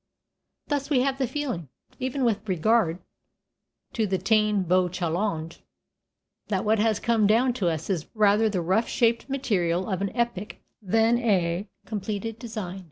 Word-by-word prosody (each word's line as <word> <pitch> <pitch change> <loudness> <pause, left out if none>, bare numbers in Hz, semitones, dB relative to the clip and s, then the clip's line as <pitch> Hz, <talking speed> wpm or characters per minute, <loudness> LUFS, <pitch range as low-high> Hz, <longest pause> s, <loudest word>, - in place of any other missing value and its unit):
Thus, 285 -1 -2
we 270 -4 +3
have 270 +1 0
the 260 - +1
feeling, 245 - -4 0.3
even 260 +1 -2
with 220 -2 -1
regard 185 0 +2 1.0
to 220 -2 0
the 190 0 0
Táin 210 0 +2
Bó 180 +1 +3
Cúalnge, 170 -1 -2 0.9
that 195 -2 -1
what 215 +1 +3
has 215 -1 +2
come 225 -3 +2
down 240 +4 +3
to 195 -8 0
us 160 -1 -3
is 175 -6 -2
rather 215 +1 +4
the 190 -4 -1
rough 190 +7 +1
shaped 235 +2 +1
material 185 -10 0
of 190 -2 -2
an 200 - 0
epic 235 -5 -2 0.2
than 225 +4 +2
a 190 -4 +1 0.2
completed 215 +1 -4
design. 215 -6 -6
210 Hz, 155 wpm, -26 LUFS, 185-235 Hz, 1.0 s, rather